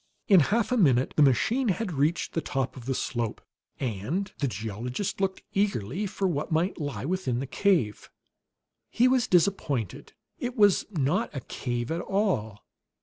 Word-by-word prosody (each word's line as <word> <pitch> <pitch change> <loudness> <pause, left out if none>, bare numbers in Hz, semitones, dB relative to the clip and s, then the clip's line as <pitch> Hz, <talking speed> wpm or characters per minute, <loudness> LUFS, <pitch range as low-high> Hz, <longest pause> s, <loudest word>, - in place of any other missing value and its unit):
In 195 -4 +7
half 215 - +1
a 250 - +2
minute 135 - +3
the - - +3
machine 215 - +3
had 205 0 -1
reached 150 +4 0
the 165 - 0
top 135 -3 -2
of 125 -3 -10
the 135 - 0
slope, 120 -3 -2 0.4
and 130 - -2
the 140 - +1
geologist 115 - -4
looked 190 -1 -1
eagerly 195 - 0
for 195 0 -1
what 155 -4 -2
might 170 +4 0
lie 145 -2 -4
within 170 -8 -1
the 135 - -3
cave. 140 - +1 0.8
He 245 +2 +3
was 255 -2 +3
disappointed; 160 - 0 0.3
it 245 +1 -4
was 205 -3 +5
not 175 - 0
a 135 - -3
cave 120 0 -4
at 165 +1 -1
all. 135 - -1
160 Hz, 160 wpm, -27 LUFS, 125-200 Hz, 0.8 s, In